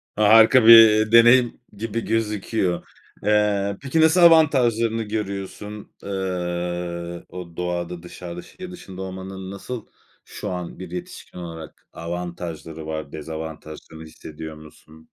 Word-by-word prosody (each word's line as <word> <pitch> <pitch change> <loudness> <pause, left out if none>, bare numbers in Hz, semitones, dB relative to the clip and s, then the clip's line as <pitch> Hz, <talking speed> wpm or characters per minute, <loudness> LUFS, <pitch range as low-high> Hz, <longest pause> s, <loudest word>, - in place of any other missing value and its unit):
Harika 110 +3 +6
bir 110 -1 +8
deneyim 120 +1 +6 0.2
gibi 115 +1 -3
gözüküyor. 105 -4 -1 0.4
Eee, 100 -1 +1
peki 140 +4 0
nasıl 160 +3 +5
avantajlarını 120 -9 +4
görüyorsun? 105 0 -6
Eee, 90 -2 -4
o 90 -2 -9
doğada 90 -1 -4
dışarıda 90 0 -8
şehir 185 0 -11
dışında 95 - -10
olmanın 95 0 -7
nasıl 115 +4 -7 0.4
şu - - -7
an 90 -1 -6
bir 90 -2 -8
yetişkin 90 0 -8
olarak 80 -2 -9
avantajları 85 -2 -6
var? 80 -2 -5
Dezavantajlarını 80 0 -8
hissediyor 80 0 -10
musun? 80 +1 -16
95 Hz, 110 wpm, -22 LUFS, 85-110 Hz, 0.4 s, bir